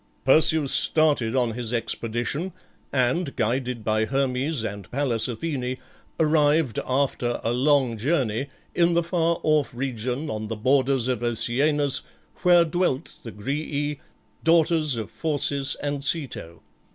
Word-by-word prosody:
Perseus 155 Hz, +1 st, +4 dB
started 145 Hz, -7 st, +3 dB
on 125 Hz, -3 st, +1 dB
his 120 Hz, -1 st, -3 dB
expedition, 120 Hz, +8 st, -2 dB, 0.4 s
and, 135 Hz, +4 st, 0 dB
guided 125 Hz, 0 st, -1 dB
by 110 Hz, 0 st, +1 dB
Hermes 135 Hz, +1 st, 0 dB
and 100 Hz, -3 st, -6 dB
Pallas 125 Hz, -4 st, +1 dB
Athene, 130 Hz, 0 st, -3 dB, 0.4 s
arrived, 150 Hz, -4 st, +2 dB
after 130 Hz, -2 st, 0 dB
a 115 Hz, -, 0 dB
long 130 Hz, -2 st, +2 dB
journey, 130 Hz, -2 st, 0 dB, 0.3 s
in 170 Hz, -1 st, +2 dB
the 170 Hz, -, +2 dB
far 170 Hz, -1 st, 0 dB
off 150 Hz, -4 st, +1 dB
region, 125 Hz, +2 st, -3 dB
on 110 Hz, -3 st, -4 dB
the 115 Hz, -, -4 dB
borders 130 Hz, +2 st, +2 dB
of 125 Hz, -3 st, -1 dB
Oceanus, 135 Hz, +5 st, +1 dB, 0.4 s
where 175 Hz, -2 st, +5 dB
dwelt 170 Hz, -3 st, -2 dB
the 115 Hz, -, -8 dB
Grææ, 145 Hz, +5 st, -3 dB, 0.4 s
daughters 160 Hz, -3 st, +3 dB
of 110 Hz, -3 st, -5 dB
Phorcys 145 Hz, -3 st, -1 dB
and 145 Hz, -1 st, -2 dB
Ceto. 125 Hz, -, -3 dB
135 Hz, 130 wpm, -24 LUFS, 120-155 Hz, 0.4 s, where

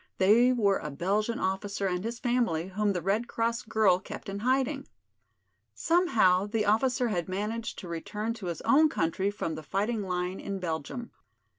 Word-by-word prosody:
They 225 Hz, +6 st, +5 dB
were 205 Hz, -6 st, +2 dB
a 150 Hz, -, -5 dB
Belgian 200 Hz, +10 st, -1 dB
officer 195 Hz, +1 st, -2 dB
and 180 Hz, -1 st, -1 dB
his 230 Hz, +1 st, -4 dB
family 235 Hz, -9 st, 0 dB
whom 205 Hz, +1 st, 0 dB
the 180 Hz, -3 st, -3 dB
Red 210 Hz, +6 st, 0 dB
Cross 230 Hz, -1 st, -1 dB
girl 215 Hz, -5 st, +3 dB
kept 195 Hz, -, -8 dB
in 195 Hz, +1 st, -4 dB
hiding. 265 Hz, +4 st, 0 dB, 0.9 s
Somehow 225 Hz, -, +3 dB
the 215 Hz, 0 st, 0 dB
officer 245 Hz, +3 st, +2 dB
had 175 Hz, -4 st, -2 dB
managed 215 Hz, +4 st, -3 dB
to 185 Hz, -, -8 dB
return 210 Hz, +7 st, -3 dB
to 220 Hz, -5 st, -7 dB
his 170 Hz, -3 st, -4 dB
own 310 Hz, +2 st, +5 dB
country 190 Hz, -, 0 dB
from 205 Hz, -5 st, -3 dB
the 155 Hz, -, -6 dB
fighting 210 Hz, +7 st, -1 dB
line 180 Hz, -1 st, -2 dB
in 200 Hz, -1 st, -4 dB
Belgium. 180 Hz, -, -4 dB
205 Hz, 170 wpm, -29 LUFS, 185-235 Hz, 0.9 s, They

